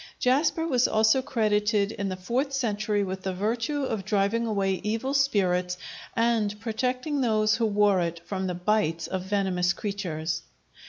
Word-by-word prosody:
Jasper 300 +6 +2
was 255 -6 +3
also 220 +4 +3
credited 210 -4 +1
in 200 -3 -3
the 185 - -3
fourth 245 +9 -2
century 215 -5 0
with 190 0 -4
the 190 -1 -3
virtue 230 +8 -1
of 220 -6 -2
driving 210 +4 +1
away 195 -3 0
evil 225 +6 -1
spirits 185 -10 +1 0.4
and 225 -3 +1
protecting 250 +6 -1
those 215 -3 +2
who 230 -1 +1
wore 205 -2 +3
it 170 -1 -2
from 190 0 -3
the 180 - -2
bites 175 -3 0
of 190 - -3
venomous 185 -2 0
creatures. 175 -7 -3
210 Hz, 155 wpm, -26 LUFS, 190-235 Hz, 0.4 s, was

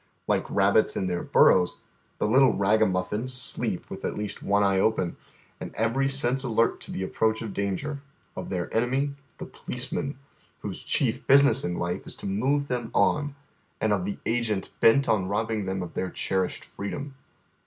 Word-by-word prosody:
Like - - 0
rabbits 100 +2 +3
in 95 - -1
their 90 -1 -1
burrows, 90 -2 +4 0.4
the - - 0
little 130 +4 +5
ragamuffins 105 +2 +1
sleep 125 - -2
with - - -7
at - - -3
least 105 -1 -5
one 100 +1 +2
eye 95 -1 +3
open, 95 -4 +1 0.4
and - - -7
every 115 +5 +1
sense 135 -1 +1
alert 115 -2 +1
to - - -8
the 95 - -3
appi'oaeli 110 +3 0
of 110 -3 -5
danger: 120 +9 -3 0.3
of - - -6
their - - -3
enemy, 130 +5 +1 0.2
the - - -6
policeman, 135 +3 -4 0.4
whose - - -5
chief 130 -1 0
business 140 0 +6
in 90 - -2
life 85 0 -3
is - - -5
to - - -10
move 135 +9 0
them 120 -3 -2
on, 145 -1 +2 0.4
and 110 -1 +2
of 95 -3 -1
the 100 - -3
agent 115 -4 -1
bent 135 +5 +5
on 95 -4 +2
robbing 110 0 -1
them 95 -1 -2
of 85 - -8
their 95 - -2
cherished 95 +1 -1
freedom. 135 +8 -6
110 Hz, 175 wpm, -26 LUFS, 95-130 Hz, 0.4 s, business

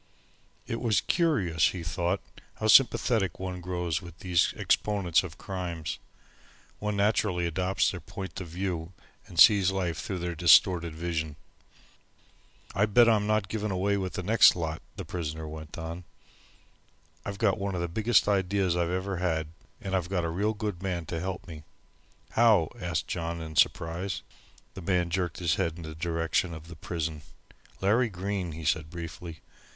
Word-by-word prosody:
It 115 - -4
was 110 -6 +3
curious, 100 - +2
he 90 -3 -4
thought, 85 +2 -1 0.3
how - - -5
sympathetic 110 -5 +4
one 90 -1 -4
grows 90 -2 -2
with 85 -2 -11
these 90 0 +2
exponents 100 -6 +2
of 85 -3 -9
crimes. 90 -5 -4 0.8
One 105 0 -2
naturally 100 -3 +1
adopts 90 +3 +1
their 90 - -6
point 95 +2 -7
of 90 - -6
view 90 0 -4 0.3
and 85 - -6
sees 100 -2 +8
life 90 -4 -2
through 95 - -4
their 85 0 -3
distorted 85 0 +5
vision. 80 -2 -3 1.4
"I 100 +3 +2
bet 115 +3 +6
I'm 105 -2 +3
not 110 -2 +1
given 105 +1 -2
away 100 +2 +1
with 95 -2 -3
the 90 - -4
next 110 +5 +6
lot," 80 -2 -3
the - - -6
prisoner 80 -2 -4
went 80 +1 -8
on. 85 +2 -6 1.2
"I've 100 -1 -5
got 105 - +2
one 100 -1 -2
of 85 - -2
the 85 - -1
biggest 110 +8 +2
ideas 95 -2 +1
I've 85 -1 0
ever 95 +1 -2
had, 80 -3 -1 0.3
and 95 -1 -3
I've 90 -2 -1
got 90 -3 0
a - - -1
real 105 +6 0
good 105 -4 -4
man 90 -3 -2
to 80 +1 -4
help 95 +2 -4
me." 80 -3 -8 0.7
"How?" 110 -8 +4
asked 85 -2 -2
John, 85 -1 -3
in 80 -1 -7
surprise. 85 +5 +1 0.5
The 95 - -8
man 90 -1 0
jerked 90 -3 -1
his 85 -3 +1
head 85 -4 0
in 85 - -8
the 80 0 -7
direction 85 +1 -1
of 80 +1 -11
the 85 - -9
prison. 80 -1 -4 0.6
"Larry 110 +5 +3
Green," 95 -2 -3
he 80 0 -7
said 75 +1 0
briefly. 85 -1 -8
90 Hz, 165 wpm, -28 LUFS, 85-100 Hz, 1.4 s, sees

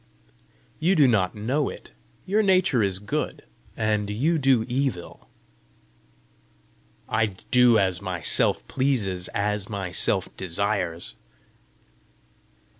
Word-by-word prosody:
"You 175 +5 +2
do 145 -5 +5
not 100 -6 +1
know 130 +8 -1
it: - - -11 0.3
your 205 +3 +2
nature 185 - +3
is 100 -2 +2
good, 105 +1 -3 0.3
and 105 -2 0
you 150 +11 0
do 130 -5 +3
evil!" 130 -8 -3 1.8
"I 110 0 +1
will 100 - -10 0.2
do 125 -2 +5
as 95 -4 +1
my 90 -2 -4
Self - - +3
pleases 105 -10 -1
as 105 -1 -1
my 100 -4 -4
Self - - 0
desires." 95 -2 -2
105 Hz, 115 wpm, -24 LUFS, 95-135 Hz, 1.8 s, do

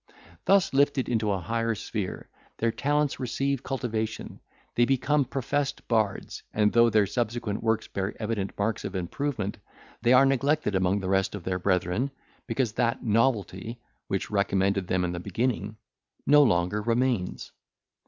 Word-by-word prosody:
Thus, 195 -5 +4
lifted 140 -1 +2
into 110 -3 0
a 95 - +1
higher 115 +3 -1
sphere, 100 -2 -4 0.3
their 115 0 +1
talents 145 +3 0
receive 135 +1 -1
cultivation; 115 -5 -3 0.3
they 120 - +3
become 135 +2 +2
professed 135 +2 -2
bards, 110 -4 -1
and 105 -1 +2
though 115 0 +6
their 105 -2 +4
subsequent 115 0 -2
works 110 -1 0
bear 95 +1 -3
evident 105 -3 -3
marks 105 +2 -1
of 95 - -5
improvement, 105 +3 -3 0.4
they 120 - +3
are 130 +2 +7
neglected 135 -2 +1
among 95 +1 +1
the 95 - -3
rest 95 +1 +1
of 100 - -7
their 90 0 -2
brethren, 90 +7 0 0.4
because 125 -5 0
that 115 +2 -1
novelty, 115 -1 0 0.3
which 95 - -2
recommended 100 -1 +1
them 90 -1 +1
in 90 - -2
the 90 - -4
beginning, 105 +2 -2 0.5
no 145 +1 +7
longer 100 -4 +2
remains. 115 -3 0
110 Hz, 150 wpm, -27 LUFS, 100-130 Hz, 0.5 s, are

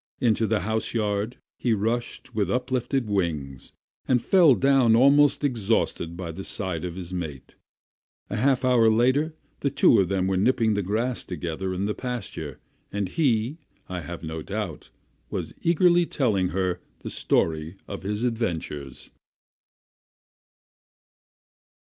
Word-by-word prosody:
Into 115 -3 +2
the 110 -1 +1
house 110 +3 -1
yard 105 +1 -1 0.2
he 120 - +2
rushed 120 +4 -2
with 105 -3 0
uplifted 125 0 -1
wings, 80 -10 -2 0.4
and 125 -2 +4
fell 165 +1 +5
down 130 0 +4
almost 140 +4 +5
exhausted 110 - 0
by 85 -2 -5
the 95 +4 -7
side 95 -6 -3
of 90 -2 -4
his 90 -1 -6
mate. 80 -7 -6 0.7
A - - -4
half 130 +2 +2
hour 120 -3 +5
later 130 +8 +2 0.2
the 140 - 0
two 140 - +4
were 95 0 0
nipping 110 +2 +3
the 100 - 0
grass 115 +6 -1
together 90 +2 -4
in 95 +2 -2
the 105 - -1
pasture, 105 - -5 0.3
and 100 -2 -2
he, 130 - +1 0.3
I 90 -1 -4
have 85 0 -7
no 80 0 -4
doubt, 100 -3 -5 0.4
was - - -4
eagerly 175 0 +4
telling 105 -10 +1
her 90 -1 -1 0.2
the - - -6
story 80 +2 0
of 100 - -6
his 105 +3 -2
adventures. 85 - -3
105 Hz, 135 wpm, -25 LUFS, 90-125 Hz, 0.7 s, fell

